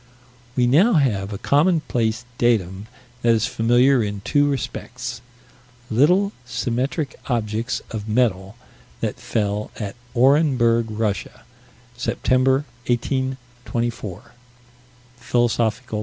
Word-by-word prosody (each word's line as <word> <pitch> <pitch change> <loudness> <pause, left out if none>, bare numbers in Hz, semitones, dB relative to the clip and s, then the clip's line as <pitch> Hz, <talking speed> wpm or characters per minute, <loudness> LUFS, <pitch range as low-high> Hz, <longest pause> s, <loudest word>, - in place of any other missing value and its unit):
We 125 - +3
now 170 - +5
have 110 - +1
a 100 - -4
commonplace 125 - +1
datum 100 -4 +1 0.3
that 120 -1 +4
is 110 0 +1
familiar 120 +3 +3
in 100 -1 -4
two 145 +7 +2
respects: 125 -2 -4 0.7
Little, 180 - +4
symmetric 125 +5 -2
objects 115 0 -1
of 110 -1 -5
metal 105 -4 +1 0.5
that - - -2
fell 105 -1 -2
at 105 -1 -4 0.2
Orenburg, 125 -3 +4
Russia, 105 -2 -3 0.5
September, 130 +2 +1 0.2
1824 120 -4 -3 0.9
(_Phil. 120 0 +2
120 Hz, 95 wpm, -22 LUFS, 110-130 Hz, 0.9 s, now